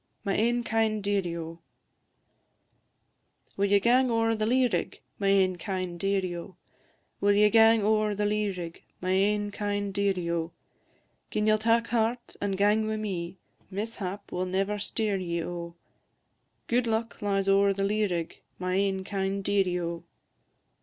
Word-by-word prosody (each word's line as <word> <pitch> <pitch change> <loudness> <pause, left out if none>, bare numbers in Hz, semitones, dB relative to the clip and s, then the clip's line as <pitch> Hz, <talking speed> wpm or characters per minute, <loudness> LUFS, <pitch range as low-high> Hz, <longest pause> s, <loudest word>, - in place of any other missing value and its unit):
MY 195 - +1
AIN 240 +3 +1
KIND 220 -2 0
DEARIE, 195 -4 0
O! 165 0 -7 2.0
Will 200 +1 +1
ye 200 0 +5
gang 250 +4 +3
ower 225 -1 +2
the 215 -1 -1
lea 255 +2 +4
rig, 235 - -3 0.2
My 200 - 0
ain 190 -2 +3
kind 185 -2 -4
dearie, 190 -1 0
O? 175 +2 -8 0.6
Will 205 0 +3
ye 210 +1 +5
gang 225 -1 +6
ower 215 0 +2
the 205 +1 0
lea 210 0 +1
rig, 175 -3 -6 0.2
My 185 0 -2
ain 205 +2 +2
kind 205 -1 -2
dearie, 190 -4 0
O? 165 0 -2 0.8
Gin 210 - -1
ye'll 215 0 +4
tak 230 +1 +3
heart, 235 +1 -1
and 195 -1 -1
gang 210 +2 +3
wi' 220 - -1
me, 190 -4 -4 0.3
Mishap 200 -1 -5
will 185 +1 -2
never 195 +3 -1
steer 210 -1 -1
ye, 170 -2 -2
O; 170 0 -6 0.9
Gude 240 0 +1
luck 225 +1 -2
lies 195 -1 0
ower 200 0 +4
the 195 0 -1
lea 210 +1 +1
rig, 170 -3 -4 0.2
My 185 0 -2
ain 195 0 +1
kind 195 0 -2
dearie, 190 -3 +1
O! 170 -1 -4
200 Hz, 160 wpm, -28 LUFS, 185-215 Hz, 2.0 s, gang